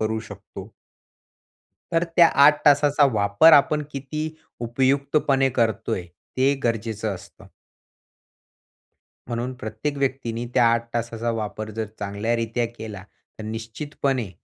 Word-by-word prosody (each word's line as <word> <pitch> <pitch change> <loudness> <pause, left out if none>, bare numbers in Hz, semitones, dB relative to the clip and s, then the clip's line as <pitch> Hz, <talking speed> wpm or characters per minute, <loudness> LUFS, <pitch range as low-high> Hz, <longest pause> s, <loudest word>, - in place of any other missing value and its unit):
करू 110 0 -1
शकतो. 100 -1 -11 1.2
तर 165 +1 +2
त्या 170 -1 +8 0.2
8 150 0 +5
तासाचा 145 0 +5
वापर, 100 +9 +5
आपण 150 +1 +5
किती 145 +3 -4 0.3
उपयुक्तपणे 135 +3 +1
करतोय, 110 -5 -1 0.3
ते 135 +2 +3
गरजेचं 110 -2 -1
असतं. 90 - -14 1.8
म्हणून 120 +1 -3
प्रत्येक 110 +7 -4
व्यक्तीने 125 -4 -2
त्या 120 - +5
8 115 0 +1
तासाचा 115 0 -2
वापर 110 0 -4
जर 110 -1 -2
चांगल्यारित्या 115 +3 -1
केला, 105 -4 -7 0.4
तर 110 - -7
निश्चितपणे 115 +1 -3
115 Hz, 110 wpm, -23 LUFS, 110-140 Hz, 1.8 s, त्या